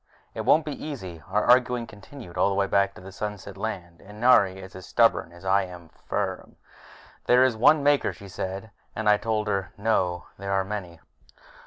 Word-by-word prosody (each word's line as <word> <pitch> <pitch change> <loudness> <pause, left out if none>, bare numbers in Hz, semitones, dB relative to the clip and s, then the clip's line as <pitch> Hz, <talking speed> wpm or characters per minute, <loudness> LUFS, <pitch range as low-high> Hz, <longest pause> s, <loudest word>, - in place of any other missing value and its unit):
It - - -4
won't 155 0 +4
be 150 - -6
easy. 95 - -7
Our 105 +2 +1
arguing 125 -1 +4
continued 105 -1 -12
all - - +3
the 100 - -1
way 100 0 +2
back 100 0 +1
to - - -12
the 95 +1 -10
Sunset 100 -1 -6
Land, 95 -5 -6
and 105 +2 -13
Nari 100 -6 +5
is 95 -1 -11
as 95 - -10
stubborn 115 -7 +2
as 85 +2 -14
I 100 +1 +3
am 90 -2 -12
firm. - - -4 0.7
"There 125 +1 +6
is 130 -3 +2
one 140 +6 +5
Maker," 145 0 +3
she 100 - -12
said. 95 +3 -6 0.2
And 110 -1 -3
I 105 0 +6
told 110 -1 -2
her, 95 -3 -2
"No, 95 -5 0
there 100 0 -3
are 95 0 +2
many." 95 -5 -6
100 Hz, 195 wpm, -26 LUFS, 95-115 Hz, 0.7 s, There